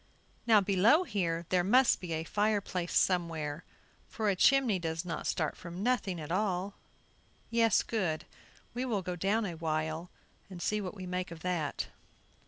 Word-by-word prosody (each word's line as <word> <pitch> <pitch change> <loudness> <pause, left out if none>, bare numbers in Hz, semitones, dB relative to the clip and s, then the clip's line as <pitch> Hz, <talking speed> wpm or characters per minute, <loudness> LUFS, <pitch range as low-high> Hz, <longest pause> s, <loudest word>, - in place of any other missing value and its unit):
Now, 220 -3 +7
below 205 - +4
here 175 - -1
there 180 -1 +3
must 245 +7 +4
be 175 -3 -4
a 160 0 -2
fire 210 +4 +1
place 180 -3 -4
somewhere, 165 -4 0 0.5
for 215 -2 -1
a - - 0
chimney 250 -2 +4
does 165 0 -3
not 165 -3 -4
start 155 -3 -1
from 175 +3 -7
nothing 220 -7 0
at 150 0 -7
all; 190 0 0 0.8
yes, 230 -2 +4
good! 180 -9 -2 0.5
we 245 +2 -2
will 220 -7 -1
go 180 0 -3
down 200 +5 +1
a 180 - -3
while 160 +1 -2 0.4
and 185 -2 -8
see 210 +4 0
what 190 0 -5
we 190 -2 -7
make 180 0 -3
of 165 -1 -10
that." 175 -5 -2
185 Hz, 170 wpm, -31 LUFS, 170-210 Hz, 0.8 s, Now